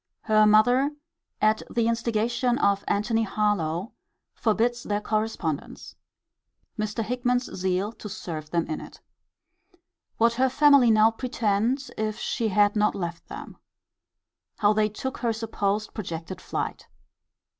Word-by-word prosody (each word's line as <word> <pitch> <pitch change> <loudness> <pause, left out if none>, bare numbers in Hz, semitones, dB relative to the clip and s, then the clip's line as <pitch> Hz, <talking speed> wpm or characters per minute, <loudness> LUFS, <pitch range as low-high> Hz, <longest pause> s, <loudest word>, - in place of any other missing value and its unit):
Her 215 -1 +4
mother, 245 +7 +4 0.5
at 215 +1 +3
the 230 -1 +1
instigation 235 +1 0
of 200 -7 +2
Antony 225 +3 +1
Harlowe, 200 -3 -1 0.4
forbids 235 +2 +1
their 205 -2 -1
correspondence. 210 -8 -3 0.8
Mr. 215 +1 -2
Hickman's 245 +2 -1
zeal 190 +2 -1
to 215 -2 -9
serve 160 -7 -6
them 170 0 0
in 155 - -4
it. - - -12 1.2
What 230 +1 +3
her 260 +2 +2
family 280 -2 +5
now 220 0 +5
pretend, 240 +1 -1
if 215 -1 -1
she 230 -3 -1
had 205 +1 +3
not 210 0 +2
left 170 -3 -5
them. - - -9 1.0
How 205 0 +4
they 215 0 +2
took 265 +5 -5
her 235 -2 0
supposed 215 -2 -2
projected 175 -2 -6
flight. - - -4
215 Hz, 125 wpm, -26 LUFS, 200-235 Hz, 1.2 s, family